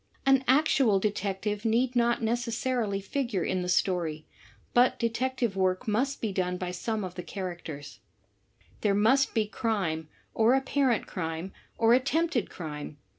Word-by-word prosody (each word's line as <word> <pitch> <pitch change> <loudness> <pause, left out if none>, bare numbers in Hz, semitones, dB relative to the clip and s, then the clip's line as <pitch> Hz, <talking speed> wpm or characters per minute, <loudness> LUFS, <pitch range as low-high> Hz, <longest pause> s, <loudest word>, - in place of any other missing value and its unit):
An 270 -1 +5
actual 265 -6 +4
detective 205 0 -2
need 240 +3 +1
not 235 0 +2
nece 235 +1 0
ssarily 230 -4 -1
figure 235 -4 -1
in 185 -1 -1
the. 180 - -3
story, 170 -4 0 0.5
but 245 +1 +4
detective 235 -1 -1
work 185 +4 0
must 260 +6 0
be 220 - -1
done 180 -1 -1
by 180 0 -4
some 215 +4 -2
^Lthe. 180 -2 -6
characters. 175 -6 -6 0.8
There 205 -2 +2
miistTSe^^me 215 - +1 0.3
or 230 +3 +4
apparent 270 -3 +1
crime 165 +1 -4 0.2
or 230 +1 +5
attempted 275 - +1
crime. 150 -3 -7
215 Hz, 130 wpm, -28 LUFS, 185-245 Hz, 0.8 s, An